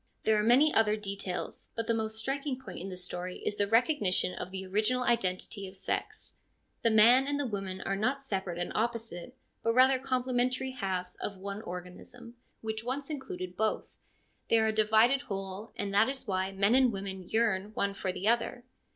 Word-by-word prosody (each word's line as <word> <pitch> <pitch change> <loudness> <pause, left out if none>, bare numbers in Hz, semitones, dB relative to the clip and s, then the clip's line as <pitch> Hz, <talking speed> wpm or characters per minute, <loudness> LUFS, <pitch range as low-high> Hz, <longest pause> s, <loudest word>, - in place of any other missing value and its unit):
There 220 - +4
are 210 - +3
many 265 +7 +5
other 215 -1 +4
details, 195 -3 -5
but 230 - -2
the 230 - +1
most 220 -1 -2
striking 270 +3 -2
point 265 - -8
in 190 +3 -6
the 185 - -7
story 180 0 -4
is 205 - -1
the 205 - +2
recognition 225 - +3
of 180 - -6
the 190 0 -6
original 215 +6 +1
identity 195 -3 0
of 190 +1 -11
sex. - - -4 0.4
The 230 - +3
man 235 +5 +6
and 285 0 0
the 285 - 0
woman 195 -4 -4
are 195 - -1
not 260 +7 0
separate 190 -8 -3
and 175 - -3
opposite, 230 -1 -3 0.2
but 230 - +1
rather 260 +1 +6
complementary 255 0 0
halves 185 -6 -3
of 200 - -4
one 200 +2 -5
organism, 180 +7 -9 0.3
which 220 0 -3
once 275 +5 -3
included 185 -11 -5
both; 215 +2 0 0.6
they 230 - +5
are 220 - +3
a 220 - +2
divided 220 +5 +4
whole, 195 -3 -6
and 200 -1 -3
that 210 +5 +5
is 270 -1 -4
why 190 -2 -1
men 200 +3 +2
and 260 -1 +5
women 195 -2 -6
yearn 215 -3 +1
one 200 0 0
for 190 -1 -2
the 185 +3 -3
other. 235 +1 +1
215 Hz, 190 wpm, -30 LUFS, 190-245 Hz, 0.6 s, man